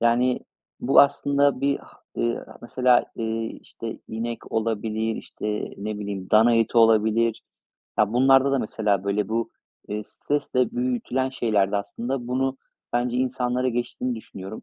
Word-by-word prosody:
yani, 120 Hz, +2 st, +2 dB, 0.4 s
bu 135 Hz, -, +6 dB
aslında 140 Hz, -1 st, +3 dB
bir 140 Hz, 0 st, +2 dB
ha -, -, -18 dB, 0.2 s
eee, 120 Hz, 0 st, 0 dB
a -, -, -12 dB
mesela, 125 Hz, 0 st, +3 dB
eee, 115 Hz, 0 st, -2 dB
işte, 115 Hz, -1 st, -8 dB
inek 115 Hz, +1 st, -5 dB
olabilir, 110 Hz, 0 st, -1 dB
işte, 105 Hz, 0 st, -4 dB
ne 105 Hz, +1 st, -4 dB
bileyim 100 Hz, -2 st, -5 dB
dana 115 Hz, +2 st, +6 dB
eti 115 Hz, +1 st, +2 dB
olabilir. 115 Hz, 0 st, +3 dB, 0.6 s
Ya, 105 Hz, +1 st, +3 dB
bunlarda 135 Hz, +2 st, +5 dB
da 135 Hz, -, +3 dB
mesela, 105 Hz, -4 st, 0 dB
böyle, 100 Hz, 0 st, 0 dB
bu, 115 Hz, +1 st, -1 dB, 0.4 s
eee, 105 Hz, 0 st, -3 dB
stresle 125 Hz, +3 st, -1 dB
büyütülen 125 Hz, +1 st, -1 dB
şeylerde 105 Hz, -6 st, +1 dB
aslında, 120 Hz, +5 st, -3 dB
bunu 135 Hz, +1 st, 0 dB, 0.3 s
bence 120 Hz, 0 st, 0 dB
insanlara 125 Hz, 0 st, 0 dB
geçtiğini 120 Hz, +1 st, -2 dB
düşünüyorum. 100 Hz, -1 st, -9 dB
115 Hz, 140 wpm, -24 LUFS, 110-125 Hz, 0.6 s, bu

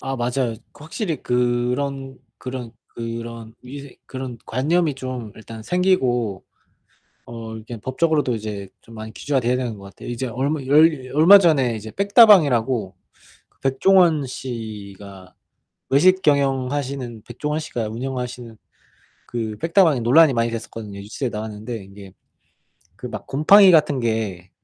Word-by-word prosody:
아 135 Hz, 0 st, -3 dB
맞아요. 120 Hz, 0 st, -1 dB, 0.2 s
확실히 160 Hz, +3 st, -5 dB
그런 125 Hz, +2 st, -1 dB, 0.2 s
그런 125 Hz, -3 st, -7 dB, 0.2 s
그런 115 Hz, -1 st, -7 dB
위생 140 Hz, +2 st, -10 dB
그런 130 Hz, -2 st, -6 dB
관념이 155 Hz, +5 st, 0 dB
좀 130 Hz, -5 st, -6 dB
일단 110 Hz, 0 st, -10 dB
생기고 125 Hz, -, 0 dB, 0.8 s
어 115 Hz, -1 st, -8 dB
이렇게 110 Hz, +2 st, -8 dB
법적으로도 145 Hz, +1 st, 0 dB
이제 105 Hz, -3 st, -6 dB
좀 115 Hz, -, -16 dB
많이 110 Hz, 0 st, -8 dB
규제가 140 Hz, +6 st, -1 dB
되어야 125 Hz, +1 st, +1 dB
되는 120 Hz, -5 st, -4 dB
것 100 Hz, -, -12 dB
같아요. 100 Hz, -, -11 dB
이제 120 Hz, +2 st, -3 dB
얼마 135 Hz, +6 st, -2 dB
열 145 Hz, -2 st, +4 dB
얼마 170 Hz, +7 st, +8 dB
전에 145 Hz, -10 st, +2 dB
이제 110 Hz, +1 st, -8 dB
빽다방이라고 145 Hz, -, +4 dB, 0.5 s
그 -, -, -39 dB
백종원 160 Hz, +2 st, +3 dB
씨가, 105 Hz, -7 st, -8 dB, 0.6 s
외식 185 Hz, +7 st, +4 dB
경영하시는 135 Hz, -4 st, -1 dB
백종원 150 Hz, +6 st, -3 dB
씨가 120 Hz, -7 st, -4 dB
운영하시는 125 Hz, -1 st, -6 dB, 0.7 s
그 110 Hz, -3 st, -4 dB
빽다방이 165 Hz, -5 st, +3 dB
논란이 140 Hz, +5 st, +5 dB
많이 115 Hz, -1 st, +1 dB
됐었거든요. 110 Hz, -3 st, -7 dB
뉴스에 115 Hz, +6 st, -4 dB
나왔는데 110 Hz, +1 st, -6 dB
이게 100 Hz, -1 st, -13 dB, 0.9 s
그 -, -, -7 dB
막 -, -, -8 dB
곰팡이 185 Hz, +8 st, +6 dB
같은 150 Hz, -4 st, +3 dB
게 110 Hz, -6 st, -3 dB
125 Hz, 300 characters per minute, -21 LUFS, 115-145 Hz, 0.9 s, 얼마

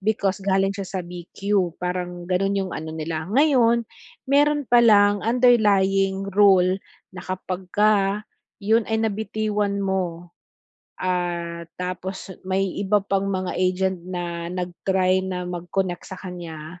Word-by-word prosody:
because 200 Hz, -1 st, 0 dB
galing 195 Hz, 0 st, +2 dB
siya 200 Hz, -1 st, -5 dB
sa 190 Hz, -, -3 dB
BQ 180 Hz, +1 st, -2 dB
parang 180 Hz, -1 st, -4 dB
gano'n 195 Hz, +2 st, 0 dB
'yong 190 Hz, -2 st, -2 dB
ano 160 Hz, 0 st, -5 dB
nila. 160 Hz, +1 st, -4 dB
Ngayon, 235 Hz, -2 st, +3 dB, 0.4 s
meron 290 Hz, +1 st, +3 dB
palang 205 Hz, -4 st, +5 dB
underlying 195 Hz, -5 st, +3 dB
rule 190 Hz, -2 st, +4 dB, 0.3 s
na 180 Hz, -, -8 dB
kapag 185 Hz, 0 st, -4 dB
ka 210 Hz, 0 st, +2 dB, 0.4 s
'yon 220 Hz, +2 st, +3 dB
ay 220 Hz, 0 st, 0 dB
nabitiwan 210 Hz, -1 st, -1 dB
mo, 175 Hz, -3 st, -2 dB, 0.7 s
ah, 175 Hz, -2 st, -2 dB, 0.2 s
tapos 185 Hz, +1 st, -5 dB, 0.2 s
may 190 Hz, 0 st, -1 dB
iba 205 Hz, +1 st, +2 dB
pang 195 Hz, -1 st, 0 dB
mga 185 Hz, -2 st, -2 dB
agent 185 Hz, 0 st, 0 dB
na 175 Hz, -2 st, -4 dB
nag-try 185 Hz, +1 st, 0 dB
na 180 Hz, -1 st, -3 dB
mag-connect 175 Hz, +1 st, -3 dB
sa 190 Hz, -, -7 dB
kanya, 170 Hz, -2 st, -8 dB
190 Hz, 125 wpm, -23 LUFS, 180-205 Hz, 0.7 s, palang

